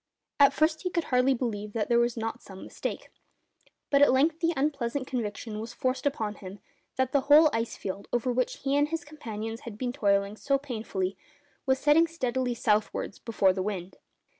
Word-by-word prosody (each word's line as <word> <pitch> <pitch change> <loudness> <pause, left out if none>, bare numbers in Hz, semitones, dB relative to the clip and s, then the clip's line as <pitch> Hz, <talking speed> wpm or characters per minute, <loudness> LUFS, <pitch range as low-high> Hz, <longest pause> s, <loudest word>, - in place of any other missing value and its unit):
At 280 -1 +7
first 310 +2 +1
he 365 - -2
could 340 -2 -1
hardly 255 0 +2
believe 210 -4 -3
that 220 -2 -1
there 235 -1 +3
was 235 0 +1
not 225 0 -3
some 190 -1 -11
mistake; - - -6 0.8
but 280 -1 +4
at 285 - +7
length 305 +5 +2
the 335 -1 +2
unpleasant 275 -2 -1
conviction 220 -3 -4
was 230 +2 -7
forced 255 +2 -1
upon 220 -7 -2
him 195 -1 -10 0.4
that 260 -1 0
the 280 - +3
whole 305 +1 +8
ice 230 0 -1
field 195 +1 -6
over 245 +1 0
which 255 +1 -1
he 275 0 +1
and 290 +1 +3
his 330 0 -3
companions 225 -7 -6
had 230 -4 -9
been 245 +1 -2
toiling 200 -4 +1
so 275 +3 +1
painfully 215 -8 -4 0.5
was 265 0 +3
setting 300 +4 +4
steadily 255 -6 -2
southwards 215 -2 0
before 200 -5 +2
the 190 - -3
wind. 190 -2 -4
245 Hz, 190 wpm, -28 LUFS, 215-280 Hz, 0.8 s, whole